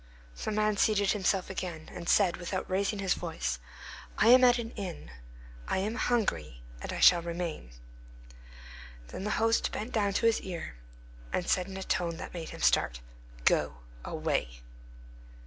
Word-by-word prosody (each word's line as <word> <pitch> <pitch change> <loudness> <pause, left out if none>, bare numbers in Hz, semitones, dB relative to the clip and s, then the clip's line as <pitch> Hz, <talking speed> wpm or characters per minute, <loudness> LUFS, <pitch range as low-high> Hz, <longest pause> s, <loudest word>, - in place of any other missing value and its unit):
The - - -1
man 215 0 +1
seated 205 -1 +3
himself 195 -2 0
again, 170 -4 -5
and 175 -1 -5
said, 190 -4 +4
without 185 +1 -4
raising 200 +3 0
his 195 -2 +1
voice, 70 - -3 0.6
"I 225 - +5
am 255 +1 +8
at 245 -1 +6
an 230 -1 -4
inn; 185 - -7 0.6
I - - 0
am 205 +4 -1
hungry, 80 - -1 0.2
and - - -5
I - - -4
shall 175 -1 +7
remain." 170 - -5 1.4
Then 190 - -6
the - - -1
host 225 +1 +2
bent 220 +4 -4
down 205 -3 +1
to 230 - +1
his 230 -1 +3
ear, 175 - -6 0.6
and 175 - -1
said 180 0 +1
in 190 0 -7
a 190 - -4
tone 170 -3 -1
which - - -8
made 170 -2 -6
him - - -9
start, - - +3 0.5
"Go - - +2 0.3
away!" - - -2
190 Hz, 165 wpm, -30 LUFS, 170-210 Hz, 1.4 s, am